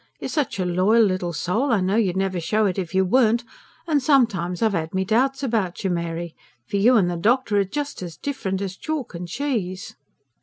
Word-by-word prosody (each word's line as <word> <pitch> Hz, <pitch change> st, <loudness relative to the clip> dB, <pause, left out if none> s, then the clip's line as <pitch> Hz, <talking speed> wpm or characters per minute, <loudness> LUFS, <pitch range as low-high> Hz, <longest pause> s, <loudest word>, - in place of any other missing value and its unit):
You're -, -, -5 dB
such 295 Hz, -9 st, -1 dB
a 185 Hz, -, -1 dB
loyal 185 Hz, +6 st, +3 dB
little 185 Hz, -3 st, 0 dB
soul, 220 Hz, -, -1 dB
I 225 Hz, -, +3 dB
know 190 Hz, +2 st, 0 dB
you'd 195 Hz, -5 st, +1 dB
never 190 Hz, -2 st, 0 dB
show 210 Hz, +6 st, +1 dB
it 195 Hz, -1 st, 0 dB
if 180 Hz, -1 st, -5 dB
you 190 Hz, 0 st, +3 dB
weren't; 235 Hz, +3 st, +3 dB, 0.4 s
and 305 Hz, -4 st, +1 dB
sometimes 230 Hz, -, +2 dB
I've 220 Hz, -2 st, +2 dB
'ad 165 Hz, -1 st, -3 dB
my 190 Hz, -, +1 dB
doubts 265 Hz, +7 st, +1 dB
about 220 Hz, -8 st, -1 dB
you, 190 Hz, -, 0 dB
Mary. 170 Hz, -1 st, -3 dB, 0.3 s
For 200 Hz, -, -1 dB
you 235 Hz, +6 st, +5 dB
and 190 Hz, -5 st, +3 dB
the 175 Hz, -, -2 dB
doctor 215 Hz, +2 st, +2 dB
are -, -, +4 dB
just 285 Hz, +7 st, -4 dB
as 175 Hz, -3 st, -7 dB
different 195 Hz, -9 st, -3 dB
as 190 Hz, -1 st, -4 dB
chalk 300 Hz, -1 st, -4 dB
and 175 Hz, 0 st, -6 dB
cheese." 195 Hz, -5 st, -3 dB
195 Hz, 215 wpm, -23 LUFS, 180-240 Hz, 0.4 s, you